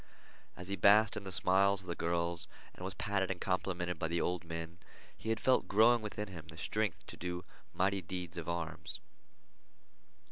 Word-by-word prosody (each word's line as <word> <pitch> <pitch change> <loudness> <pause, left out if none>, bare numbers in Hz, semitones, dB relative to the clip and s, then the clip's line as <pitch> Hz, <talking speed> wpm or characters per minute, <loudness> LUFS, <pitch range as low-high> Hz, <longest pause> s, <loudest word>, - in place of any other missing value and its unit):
As 90 +1 -7
he 100 - 0
basked 105 +2 +6
in 100 - -5
the 95 - -5
smiles 95 +2 +4
of - - -14
the 85 - -2
girls 85 0 -1 0.3
and - - -10
was 95 +1 -4
patted 100 -3 0
and 95 -2 -2
complimented 90 -2 -1
by 80 - 0
the 85 +1 0
old 90 +1 0
men, 85 0 -6 0.4
he 110 - -6
had 115 -1 +1
felt 130 -1 +3
growing 115 +3 +5
within 105 0 -4
him 85 -5 -9
the 80 +1 -11
strength 105 +1 -1
to - - -8
do 90 0 -4 0.3
mighty 95 +1 +1
deeds 90 -1 -5
of 85 -1 -4
arms. 85 -2 -4
90 Hz, 185 wpm, -34 LUFS, 85-100 Hz, 0.4 s, basked